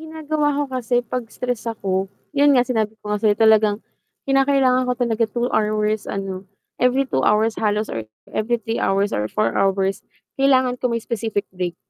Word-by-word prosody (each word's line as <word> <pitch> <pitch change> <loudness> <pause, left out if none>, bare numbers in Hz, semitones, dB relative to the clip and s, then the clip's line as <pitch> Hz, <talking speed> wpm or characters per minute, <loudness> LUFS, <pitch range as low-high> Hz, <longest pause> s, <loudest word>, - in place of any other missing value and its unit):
ginagawa 310 -2 -1
ko 290 - +1
kasi 245 -1 0
'pag 240 +1 -4
stress 245 -2 -4
ako, 195 -3 -2 0.2
'yun 285 -1 +4
nga 245 - +4
sinabi 220 -3 -1
ko 210 0 -4
nga 210 - -1
sa'yo 210 -2 +3
talagang 220 -1 +4 0.4
kinakailangan 270 -2 +3
ko - - +2
talaga 235 -2 +1
2 240 +3 -1
hours 215 0 0
ano 195 -1 -5 0.3
every 255 +2 +3
2 195 - -1
hours 215 +1 +2
halos 210 0 0
or 115 -1 -4 0.3
every 235 +3 0
3 225 +1 -4
hours 200 +1 +1
or 105 0 -1
4 215 - 0
hours, 195 0 +1 0.4
kailangan 260 -2 +4
ko 250 - 0
may 235 - 0
specific 220 -3 -2
break. 180 -2 -3
225 Hz, 175 wpm, -21 LUFS, 205-255 Hz, 0.4 s, yun